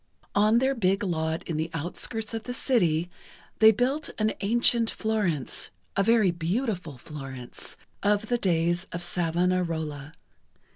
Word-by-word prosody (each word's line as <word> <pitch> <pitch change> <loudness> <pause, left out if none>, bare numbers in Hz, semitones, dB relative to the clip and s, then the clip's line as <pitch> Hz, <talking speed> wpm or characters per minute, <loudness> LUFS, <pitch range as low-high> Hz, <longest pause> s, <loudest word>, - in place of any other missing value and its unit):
On 210 +3 +4
their 265 +2 +3
big 195 -4 +1
lot 160 -3 -1
in 165 - -2
the 160 +1 -1
outskirts 205 +7 -4
of 225 -1 -4
the 245 - -3
city, 175 - +2 0.5
they 220 0 +9
built 255 +7 0
an 215 0 +1
ancient 230 +2 +3
Florence, 205 - -1 0.3
a 195 - +3
very 215 -2 +4
beautiful 175 - -2
Florence, 130 -3 -9 0.2
of 205 +1 +2
the 240 +1 +1
days 175 -2 +1
of 175 +1 -3
Savonarola. 165 -4 -1
185 Hz, 135 wpm, -27 LUFS, 165-220 Hz, 0.5 s, they